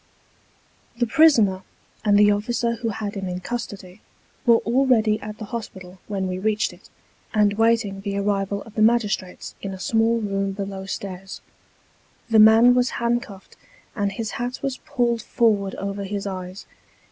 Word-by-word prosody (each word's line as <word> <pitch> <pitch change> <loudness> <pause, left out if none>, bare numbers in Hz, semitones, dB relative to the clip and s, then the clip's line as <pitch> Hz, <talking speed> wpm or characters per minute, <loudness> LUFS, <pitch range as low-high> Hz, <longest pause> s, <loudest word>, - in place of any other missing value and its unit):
The 240 - +2
prisoner, 225 -8 +4 0.4
and 205 -1 +4
the 205 0 +6
officer 235 +3 0
who 230 0 -2
had 205 -1 -4
him 195 -2 -4
in 180 0 -4
custody, 200 -3 -6 0.5
were 235 -1 +7
already 230 -3 +3
at 210 0 -8
the 215 - -7
hospital 190 -5 -7
when 195 -2 -2
we 185 0 -3
reached 215 +1 0
it, - - -18 0.5
and 210 -1 +4
waiting 225 -2 +1
the 200 0 -3
arrival 200 0 -1
of 225 - -15
the 220 - -2
magistrates 215 -5 +1
in 195 -1 -5
a - - -12
small 225 +3 +2
room 195 -2 -2
below 195 -1 -6
stairs. 195 -1 -6 0.9
The 220 - +6
man 225 +3 +7
was 250 0 +2
handcuffed, 235 -5 -3 0.4
and 200 -2 -1
his 215 +2 -4
hat 245 +2 -4
was 275 -2 -2
pulled 235 -2 -1
forward 210 -4 +1
over 200 0 -4
his 200 +1 -4
eyes. 185 -1 -6
210 Hz, 160 wpm, -23 LUFS, 195-230 Hz, 0.9 s, were